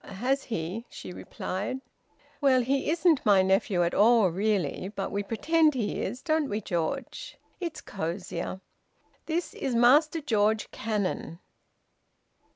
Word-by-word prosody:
"Has 260 +8 -2
he?" 205 +3 -4
she - - -9
replied. 205 +10 -4 0.6
"Well, 265 -3 +4
he 270 +3 0
isn't 330 -2 +3
my 200 -4 +5
nephew 190 -1 +2
at 170 - 0
all 220 -2 +5
really, 190 -2 -1
but 195 - -3
we 200 - -1
pretend 300 +9 +2
he 225 -5 -2
is, 245 +7 -4
don't 310 -3 +1
we, 205 - -1
George? 170 -6 -4 0.2
It's 340 -4 -5
cosier. 185 +1 -4 0.7
This 335 +2 -2
is 260 -3 -2
Master 290 +7 +5
George 220 -6 +1
Cannon." 205 -6 -3
220 Hz, 130 wpm, -28 LUFS, 190-275 Hz, 0.7 s, my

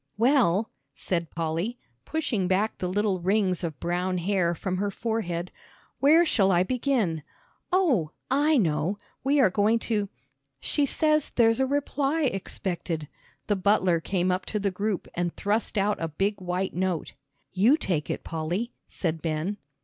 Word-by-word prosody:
"Well," 230 -5 +3 0.2
said 170 -3 -2
Polly, 165 +8 -2 0.3
pushing 250 - -1
back 200 +4 0
the 180 - -1
little 200 0 0
rings 185 0 +1
of 160 -4 -4
brown 180 +1 -1
hair 175 -1 +1
from 185 +1 -3
her 205 +2 0
forehead, 190 -5 -3 0.5
"where 320 +5 +6
shall 195 - +3
I 175 0 +4
begin? 230 - 0 0.5
Oh, 290 - +2 0.2
I 295 +3 +4
know, 175 - +1 0.3
we 285 +2 +3
are 215 -9 +5
going 210 +4 +3
to 210 -3 -1 0.2
" 135 0 -50
"She 290 - 0
says 305 +1 +3
there's 225 -1 +3
a 265 - +2
reply 285 +2 0
expected." 175 - -3 0.4
The 205 - +1
butler 190 -3 +3
came 185 +2 0
up 185 +1 -2
to 210 - -2
the 200 -1 0
group 200 +1 -2
and 175 -1 -2
thrust 210 +2 -1
out 205 -1 +1
a 165 - 0
big 195 +6 -1
white 180 +1 -2
note. 180 -2 -2 0.4
"You 220 +11 +4
take 170 - -1
it, - - -3
Polly," 175 +9 -3
said 165 -3 -2
Ben. 165 +5 -2
195 Hz, 155 wpm, -26 LUFS, 175-230 Hz, 0.5 s, where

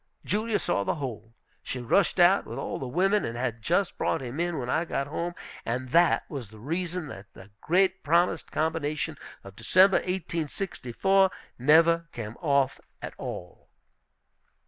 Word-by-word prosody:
Julia 215 +1 0
saw 100 - 0
the - - -1
whole. 115 -6 -6 0.3
She 130 - -5
rushed 125 +12 +2
out 180 +3 +5
with 115 - -6
all 135 - -4
the 130 - -4
women, 195 +9 +2
and 115 - -4
had 120 -2 -2
just 180 - 0
brought - - +1
him 130 +2 -6
in 175 -1 -1
when 125 - -3
I 160 +6 +1
got 140 -5 -2
home. 170 +4 -4 0.3
And 125 +2 -3
that 170 +5 +4
was 130 -8 -6
the 110 - -14
reason 170 +7 -3
that 100 -3 -10
the 95 +2 -14
great 190 +2 +2
promised 170 +4 +1
combination 155 -1 -1 0.2
of 100 0 -12
December, 185 - +5
1864, 185 0 0 0.3
never 165 +5 +5
came 110 -1 -6
off 140 -4 +2 0.2
at - - -7
all. 90 0 -8
155 Hz, 160 wpm, -27 LUFS, 125-175 Hz, 0.3 s, out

